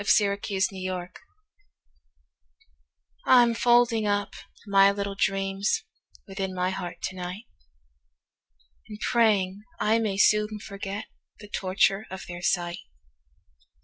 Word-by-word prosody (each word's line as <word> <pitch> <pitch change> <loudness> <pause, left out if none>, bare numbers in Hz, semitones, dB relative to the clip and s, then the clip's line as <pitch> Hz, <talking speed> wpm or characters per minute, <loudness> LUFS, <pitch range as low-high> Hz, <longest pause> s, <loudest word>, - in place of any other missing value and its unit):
My 205 - -8 0.2
Little 200 - 0
Dreams 185 -3 -3 2.2
I'M 240 -2 +6
folding 240 -2 +3
up 205 -1 0 0.3
my 195 -1 +5
little 200 0 -4
dreamsWithin 195 0 -3
my 180 0 0
heart 175 -2 -6
to 185 - -3
night, 180 +3 -6 1.5
And 210 -1 -8
praying 205 -5 +2 0.2
I 220 +2 +2
may 210 -4 -1
soon 210 +1 +3
forgetThe 205 +1 -9
torture 195 +2 +1
of 190 0 -7
their 175 0 -7
sight. 175 -1 0
200 Hz, 100 wpm, -26 LUFS, 190-210 Hz, 2.2 s, I'M